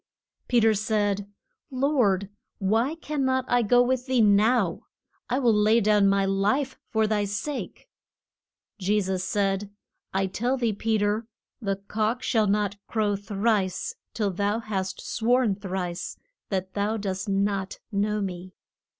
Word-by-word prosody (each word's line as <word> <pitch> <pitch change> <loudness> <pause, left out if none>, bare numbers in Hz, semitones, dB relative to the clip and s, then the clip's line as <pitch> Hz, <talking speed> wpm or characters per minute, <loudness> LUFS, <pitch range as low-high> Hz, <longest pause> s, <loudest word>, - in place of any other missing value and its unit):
Pe 245 - +4
ter 225 -1 +4
said, 205 -2 0 0.4
Lord, 250 -8 +1 0.3
why 225 +9 +1
can 300 -3 -3
not 260 -1 +1
I 245 0 +3
go 245 +3 +4
with 255 +1 -1
thee 260 -1 +2
now? 210 -2 +3 0.4
I 250 - +1
will 245 -4 +3
lay 215 +2 +4
down 210 -2 +4
my 195 0 +2
life 210 +8 +1
for 220 -1 +2
thy 210 -1 +1
sake! 205 +9 -5 0.9
Je 205 +2 +2
sus 190 -2 -1
said, 195 +1 0 0.4
I 195 0 +1
tell 240 +7 -1
thee, 235 -4 0
Pe 220 +2 0
ter, 210 +2 0 0.3
the 195 -3 0
cock 215 +4 -2
shall 220 -3 +2
not 205 0 0
crow 210 -3 0
thrice 205 - -1 0.2
till 210 -4 0
thou 205 +3 0
hast 195 -4 -4
sworn 240 -1 +2
thrice 185 -3 -4 0.3
that 190 -1 -2
thou 210 +2 0
dost 195 0 -3
not 195 0 0
know 210 +1 0
me. 185 -1 -5
210 Hz, 145 wpm, -26 LUFS, 195-230 Hz, 0.9 s, Pe